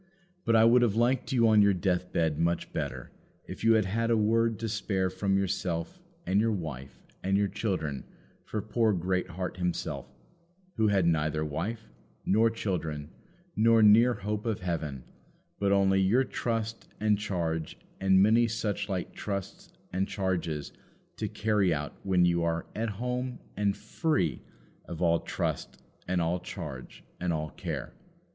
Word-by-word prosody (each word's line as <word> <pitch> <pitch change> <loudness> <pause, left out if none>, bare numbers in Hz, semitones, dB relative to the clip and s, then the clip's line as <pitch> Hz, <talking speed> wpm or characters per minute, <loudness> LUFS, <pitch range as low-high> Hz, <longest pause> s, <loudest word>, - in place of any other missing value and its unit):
But 115 - +3
I 110 0 +7
would 120 +2 +6
have 115 -4 +2
liked 120 +2 +1
you 120 -3 +4
on 110 -1 +6
your 100 -1 +4
deathbed 90 -4 0
much 85 +1 0
better - - -4 0.3
if - - -8
you 115 0 +6
had 110 -2 +3
had 115 +4 0
a 115 - +3
word 115 +1 +2
to 115 - -3
spare 100 -4 -1
from 95 +1 0
yourself 85 -3 -2 0.3
and 95 +3 +2
your 115 0 +2
wife 70 - -6 0.2
and 95 +1 +1
your 100 0 +2
children 85 -10 -3 0.4
for 105 -2 -4
poor 110 0 +2
Greatheart 90 0 -2
himself, 90 -6 -2 0.7
who 110 -1 +2
had 100 -4 +3
neither 80 -1 +1
wife 85 +10 -4 0.4
nor 110 +4 +4
children, 80 -9 -3 0.4
nor 115 0 +5
near 115 +4 +6
hope 105 +2 -3
of 110 -4 -1
heaven, 80 -7 -3 0.6
but 100 -1 +2
only 95 -1 +4
your 110 +8 +4
trust 115 -3 -3
and 105 -1 +2
charge 85 -6 -2 0.2
and 95 0 +5
many 115 +3 +5
suchlike 105 -4 -2
trusts 100 -2 -5 0.2
and 95 +1 0
charges 85 -6 -2 0.4
to - - -2
carry 105 -4 +1
out 75 -2 -2
when 90 -2 +3
you 85 -1 +2
are 85 0 -1
at 115 +1 -1
home 125 +4 -3 0.2
and 100 -1 0
free 155 - -1 0.4
of 85 - -7
all 85 -1 +3
trust - - -3 0.3
and 90 0 +1
all 85 +2 0
charge 75 -10 -8 0.2
and 90 -1 -1
all 75 -1 -2
care. - - -5
95 Hz, 155 wpm, -29 LUFS, 85-110 Hz, 0.7 s, I